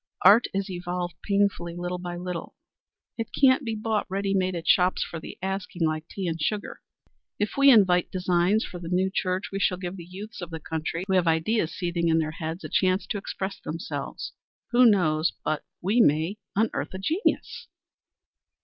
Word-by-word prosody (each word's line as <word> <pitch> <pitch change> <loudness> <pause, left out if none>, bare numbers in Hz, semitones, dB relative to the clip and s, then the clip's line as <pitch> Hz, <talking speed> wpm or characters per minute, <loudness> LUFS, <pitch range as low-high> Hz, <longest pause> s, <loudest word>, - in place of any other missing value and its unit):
Art 205 +6 +7
is 195 0 -2
evolved 175 -1 -4
painfully, 200 -4 0
little 175 +1 -3
by 175 -1 -5
little; 180 -1 -5 0.6
it 225 - -2
can't 270 0 +5
be 225 -3 -2
bought 215 0 -1
ready 195 +1 -1
made 185 -1 +1
at 165 - -5
shops 180 +1 +4
for 165 - -6
the - - -9
asking 190 -3 -2
like 155 0 -2
tea 195 - -5
and 165 -2 -2
sugar. 205 +6 -2 0.6
If 210 - -1
we 275 0 +6
invite 185 -8 +5
designs 180 +3 +2
for 175 - -8
the 170 -1 -7
new 185 +1 +1
church, 185 +5 -1
we 195 - -3
shall 180 -2 +2
give 180 +1 -5
the 175 - -8
youths 195 +6 -9
of 175 - -6
the 165 -1 -6
country 160 +2 -3
who 195 - -1
have 180 -2 +3
ideas 165 +3 +1
seething 170 -1 -1
in 165 0 +3
their 155 -1 0
heads 165 +1 -5
a - - -4
chance 185 +1 +2
to 205 - -1
express 195 0 -5
themselves. 165 +2 -5 0.4
Who 245 0 +7
knows 165 -6 +3
but 155 - -1 0.2
we 210 +6 +3
may 160 +5 +2 0.2
unearth 215 -2 0
a - - -3
genius?" 320 - -1
185 Hz, 185 wpm, -26 LUFS, 170-200 Hz, 0.6 s, Art